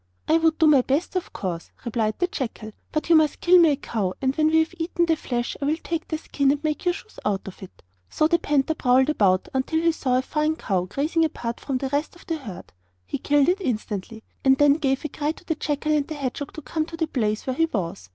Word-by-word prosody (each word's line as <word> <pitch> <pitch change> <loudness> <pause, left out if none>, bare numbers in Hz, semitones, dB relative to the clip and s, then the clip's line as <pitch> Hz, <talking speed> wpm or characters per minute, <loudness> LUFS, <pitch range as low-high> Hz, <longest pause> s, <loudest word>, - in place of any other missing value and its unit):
'I 320 - +5
would 320 -1 +2
do 320 - +4
my 295 -4 +6
best, 285 +9 -1
of 365 - -2
course,' 175 -4 -5 0.2
replied 220 -2 0
the 360 - +2
jackal; 235 -9 -5 0.2
'but 305 - -2
you 335 - +6
must 315 -2 +3
kill 360 +1 +6
me 335 -2 +6
a - - +1
cow, 210 -9 -3
and 265 0 0
when 310 0 +3
we 320 +1 +3
have 320 +2 +2
eaten 340 +1 0
the 330 -1 +2
flesh 240 -5 -3
I - - 0
will 305 +2 +1
take 330 -1 -3
the 315 - -2
skin 280 -3 0
and 290 +2 0
make 310 +3 -2
your 355 -1 +2
shoes 440 - -12
out 200 -2 -1
of 195 - -10
it.' 190 - -12 0.3
So 310 - +1
the 340 +1 +2
panther 295 -1 +1
prowled 260 -1 +3
about 190 -9 +2
until 265 +5 0
he 335 0 +3
saw 255 -5 0
a 255 - 0
fine 305 +3 0
cow 185 - -1
grazing 300 - 0
apart 240 -7 -3
from 270 -2 -2
the 265 +1 -3
rest 290 +4 -2
of 345 - -17
the 330 -3 -2
herd. 215 - -10 0.3
He 90 - -4
killed 290 -1 +3
it 370 +3 +2
instantly, 220 - -4 0.2
and 265 0 +5
then 290 0 +6
gave 270 -2 0
a - - -2
cry 295 +2 -2
to 350 - -18
the 325 - 0
jackal 305 0 -2
and 295 -2 +1
hedgehog 285 -1 -4
to 310 - -8
come 315 +1 -2
to 330 - -8
the 325 - +1
place 215 -8 -1
where 260 - -2
he 325 - +3
was. 170 - -4
290 Hz, 255 wpm, -24 LUFS, 245-320 Hz, 0.3 s, my